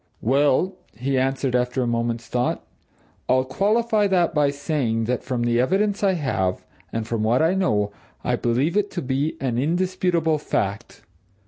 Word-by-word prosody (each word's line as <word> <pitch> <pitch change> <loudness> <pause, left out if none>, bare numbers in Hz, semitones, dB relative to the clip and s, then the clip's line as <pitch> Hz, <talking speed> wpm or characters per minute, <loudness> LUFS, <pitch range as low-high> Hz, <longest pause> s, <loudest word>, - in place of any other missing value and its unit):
"Well," 145 - +2 0.2
he 135 +3 -1
answered 135 -1 0
after 125 +1 +1
a - - -1
moment's 115 0 -1
thought, 125 0 -1 0.6
"I'll 130 0 +3
qualify 210 - +2
that 180 -3 +2
by 150 -2 +3
saying 140 -5 -1
that 120 +2 -1
from 125 -2 -2
the 120 0 +2
evidence 200 +10 +1
I 195 -1 +4
have, 95 - -1 0.3
and 115 -1 -2
from 115 -2 -1
what 120 +7 +2
I 165 +3 +3
know, 105 - +1 0.3
I - - +1
believe 130 +9 0
it 205 -1 +1
to 175 - -2
be 135 +4 -1
an 125 -3 -1
indisputable 170 0 +1
fact. 100 -5 -3
135 Hz, 160 wpm, -23 LUFS, 120-175 Hz, 0.6 s, I